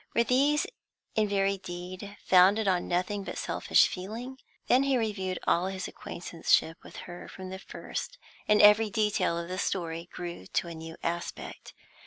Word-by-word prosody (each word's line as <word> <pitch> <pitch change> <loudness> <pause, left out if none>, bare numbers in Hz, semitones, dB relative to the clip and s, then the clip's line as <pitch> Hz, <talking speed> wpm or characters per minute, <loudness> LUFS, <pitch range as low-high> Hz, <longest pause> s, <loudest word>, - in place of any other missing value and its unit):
Were 235 - +5
these 280 +5 +3 0.5
in 215 -1 +2
very 195 -1 +1
deed 185 +3 -7
founded 195 +4 +5
on 180 -2 +1
nothing 185 +3 -1
but - - -6
selfish - - +3
feeling? 230 +8 -6 0.3
Then 255 - +4
he 275 -1 +2
reviewed 195 -5 -2
all 175 +2 +2
his 190 -1 -4
acquaintanceship 165 -1 -1
with - - -13
her 175 0 -9
from 185 -1 -8
the 190 - -6
first, - - -6 0.3
and 210 0 +5
every 210 +1 +7
detail 210 -5 +1
of 170 0 -4
the 185 +1 -4
story 170 -3 -2
grew 170 - -7
to - - -1
a 170 - -6
new 160 0 -8
aspect. 170 +1 -5
190 Hz, 165 wpm, -29 LUFS, 175-210 Hz, 0.5 s, every